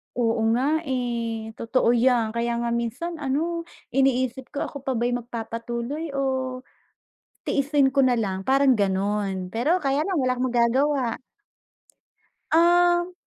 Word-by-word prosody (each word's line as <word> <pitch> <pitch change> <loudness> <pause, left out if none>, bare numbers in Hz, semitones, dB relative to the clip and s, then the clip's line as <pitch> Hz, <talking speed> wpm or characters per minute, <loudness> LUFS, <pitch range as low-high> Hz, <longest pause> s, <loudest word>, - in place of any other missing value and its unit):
Oo 230 -2 +1
nga, 255 - 0 0.2
eh. 230 -3 -2
Totoo 230 +1 +2
'yan. 240 -2 +2
Kaya 235 +1 -1
nga 235 - -1
minsan 235 +9 -3
ano, 330 +5 -2 0.2
iniisip 260 -1 +1
ko, 280 - -4
ako 285 - -6
pa 265 -1 -3
ba'y 240 +2 0
magpapatuloy 235 +4 -4
o - - -1 1.3
tiisin 280 -1 +2
ko 275 - +4
na 250 -2 +3
lang, 190 -3 -2
parang 270 +3 +4
gano'n. 195 -2 -1
Pero 300 +11 +2
kaya 280 -1 0
lang, 370 -2 -1
wala 255 -1 +1
kang 255 +1 -1
magagawa. 250 +2 +1 1.3
Um 350 +1 +4
250 Hz, 130 wpm, -24 LUFS, 230-280 Hz, 1.3 s, ko